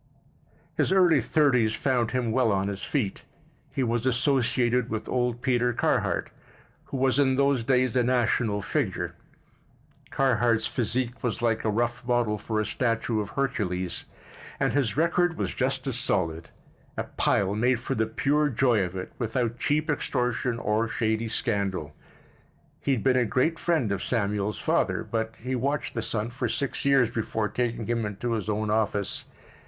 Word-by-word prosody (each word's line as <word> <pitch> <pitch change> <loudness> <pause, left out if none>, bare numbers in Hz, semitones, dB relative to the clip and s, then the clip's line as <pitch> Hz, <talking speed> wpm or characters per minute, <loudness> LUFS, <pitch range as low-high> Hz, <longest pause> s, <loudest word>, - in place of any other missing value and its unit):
His - - +2
early 175 -7 +5
thirties 120 -4 +2
found 125 -4 +1
him 125 -3 -1
well 120 -2 +3
on 100 0 0
his 100 -1 -5
feet. 115 -9 -2 0.5
He 135 - -1
was 120 -1 0
associated 125 -2 +2
with 110 -1 -4
old 125 -1 -1
Peter 125 -2 +2
Carhart, - - 0 0.5
who 135 - -5
was 130 +1 +2
in 130 -2 +3
those 140 -2 +2
days 130 0 +2
a 125 - +4
national 120 -4 +1
figure. - - -1 1.0
Carhart's 120 -4 +2
physique 120 +2 -1
was 120 -2 -2
like 115 -2 +1
a 110 - +1
rough 120 +3 -1
model 120 -4 +1
for 110 +1 -2
a 110 - 0
statue 115 -2 0
of 100 - -5
Hercules, 95 -10 -2 0.5
and - - +1
his 140 -3 0
record 170 +1 +2
was - - -2
just 130 0 -1
as 130 -3 -2
solid—a 85 -9 -4
pile 100 0 +2
made 120 +3 +2
for - - -3
the 110 0 0
pure 145 +6 +1
joy 120 -4 +2
of 90 +1 -5
it, 90 0 -5
without 120 0 -1
cheap 150 +1 +1
extortion 125 -4 -1
or 110 0 0
shady 110 0 -1
scandal. 100 - -1 0.8
He 140 - 0
had 120 - -1
been 130 -1 +3
a 125 - +3
great 130 +9 +1
friend 155 - +1
of 100 - -2
Samuel's 105 -3 -1
father, - - 0
but 110 -1 -3
he 125 +3 -4
watched 140 +4 -1
the 115 - -2
son 110 +1 -2
for 125 - -2
six 140 - -2
years 135 -4 +4
before 110 -1 -2
taking 120 -2 -2
him 115 0 -1
into 105 +3 -3
his 110 -2 -2
own 105 0 -1
office. 105 -2 -1
120 Hz, 165 wpm, -27 LUFS, 110-130 Hz, 1.0 s, early